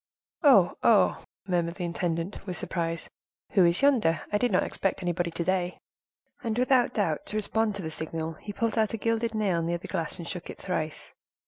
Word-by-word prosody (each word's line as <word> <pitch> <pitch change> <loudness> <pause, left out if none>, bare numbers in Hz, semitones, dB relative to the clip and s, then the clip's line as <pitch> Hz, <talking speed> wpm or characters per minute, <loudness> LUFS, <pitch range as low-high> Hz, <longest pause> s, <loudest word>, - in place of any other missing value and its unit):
"Oh! 255 - +6
oh!" 220 -3 +4 0.2
murmured 170 -2 0
the 180 - -5
intendant, 170 +3 -3
with 180 -2 -3
surprise, 165 -1 -2 0.4
"who 190 - +5
is 170 +8 +3
yonder? 225 - +4
I 205 - +2
did 245 +1 +1
not - - +3
expect 195 -1 -2
anybody 175 0 0
to 170 +1 -3
day." 180 0 0 0.7
And 225 -2 -1
without 250 0 +3
doubt, 165 -8 0
to - - -6
respond 215 0 0
to 200 - -4
the 160 - -4
signal, 160 +1 -4
he 205 +6 -8
pulled 225 +2 -1
out 220 0 +1
a - - -4
gilded 230 +1 0
nail 195 -6 +1
near 170 +1 -1
the 170 - -9
glass, 170 -2 -3
and 170 -2 -7
shook 180 -2 -6
it - - -7
thrice. 160 -4 -4
185 Hz, 200 wpm, -28 LUFS, 170-220 Hz, 0.7 s, Oh